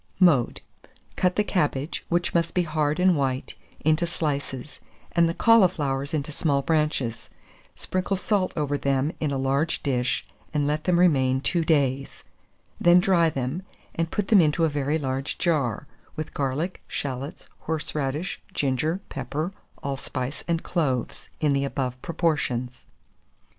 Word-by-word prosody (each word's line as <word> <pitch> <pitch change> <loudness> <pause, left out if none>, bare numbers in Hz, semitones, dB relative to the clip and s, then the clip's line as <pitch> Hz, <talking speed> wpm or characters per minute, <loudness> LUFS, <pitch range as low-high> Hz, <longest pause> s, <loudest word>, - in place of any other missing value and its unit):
Mode. 155 -10 +4 0.5
Cut 180 -1 +2
the 210 - +3
cabbage, 150 -6 -1
which 175 0 +1
must 170 -1 +1
be 180 - +3
hard 155 -1 0
and 180 -1 +5
white, 135 -2 -1 0.3
into 155 +3 +2
slices, 145 -4 -3 0.3
and 170 -1 +3
the - - -1
cauliflowers 155 -11 +3
into 155 -1 -2
small 145 -2 +1
branches; 150 -6 0 0.5
sprinkle 185 +1 -1
salt 190 0 +1
over 145 -1 0
them 140 +2 +1
in 155 - 0
a 140 - -1
large 135 +5 0
dish, 125 -3 0 0.3
and 145 -1 +2
let 150 +1 -1
them 180 -2 +3
remain 130 -7 +4
two 170 +5 0
days; 140 -4 0 0.6
then 175 +1 +6
dry 180 -3 +4
them, 135 +4 -3 0.3
and 165 0 -1
put 205 +1 -2
them 210 -5 +7
into 160 +1 +3
a - - +2
very 145 +1 0
large 135 -2 -2
jar, 145 - 0 0.3
with 155 -1 -5
garlic, 145 +6 -2
shalots, 135 +1 -5
horseradish, 150 +1 -2
ginger, 150 +7 0
pepper, 145 +7 -3 0.3
allspice, 135 -1 -4
and 170 -1 0
cloves, 135 -8 -1
in 150 -2 +2
the 140 0 +1
above 130 -2 -3
proportions. 145 -8 -1
150 Hz, 140 wpm, -25 LUFS, 135-170 Hz, 0.6 s, them